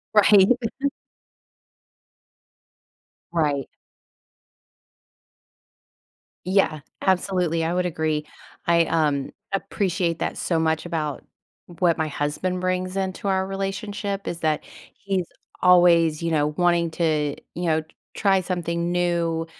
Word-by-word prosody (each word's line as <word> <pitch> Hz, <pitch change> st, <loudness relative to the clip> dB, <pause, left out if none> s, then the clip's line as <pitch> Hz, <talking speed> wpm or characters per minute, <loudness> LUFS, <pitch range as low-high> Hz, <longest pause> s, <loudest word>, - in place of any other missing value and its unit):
Right. 200 Hz, -2 st, +7 dB, 2.8 s
Right. 145 Hz, -5 st, +1 dB, 2.8 s
Yeah. 185 Hz, -5 st, +2 dB, 0.2 s
Absolutely. 180 Hz, -3 st, +1 dB
I 170 Hz, -, 0 dB
would 180 Hz, 0 st, 0 dB
agree. 155 Hz, -2 st, -1 dB, 0.4 s
I, 170 Hz, -1 st, +4 dB
um, 150 Hz, -4 st, 0 dB, 0.2 s
appreciate 190 Hz, -3 st, -1 dB
that -, -, -2 dB
so 165 Hz, -2 st, 0 dB
much 160 Hz, 0 st, 0 dB
about 155 Hz, -4 st, -3 dB, 0.6 s
what 175 Hz, -3 st, +3 dB
my 160 Hz, -, 0 dB
husband 155 Hz, +5 st, -2 dB
brings 185 Hz, 0 st, -1 dB
into 190 Hz, +1 st, -2 dB
our 190 Hz, -1 st, +1 dB
relationship 195 Hz, +1 st, -4 dB
is 170 Hz, -, -3 dB
that 155 Hz, -1 st, 0 dB, 0.3 s
he's 195 Hz, -3 st, -2 dB, 0.4 s
always, 170 Hz, -3 st, +5 dB
you 165 Hz, -, -1 dB
know, 150 Hz, -2 st, +2 dB
wanting 175 Hz, -2 st, +2 dB
to, 155 Hz, -3 st, 0 dB, 0.2 s
you 175 Hz, +2 st, -3 dB
know, 160 Hz, -1 st, +2 dB
t 155 Hz, -, -20 dB, 0.3 s
try 195 Hz, -2 st, +3 dB
something 170 Hz, -1 st, -2 dB
new, 170 Hz, -2 st, 0 dB
170 Hz, 105 wpm, -24 LUFS, 160-185 Hz, 2.8 s, Right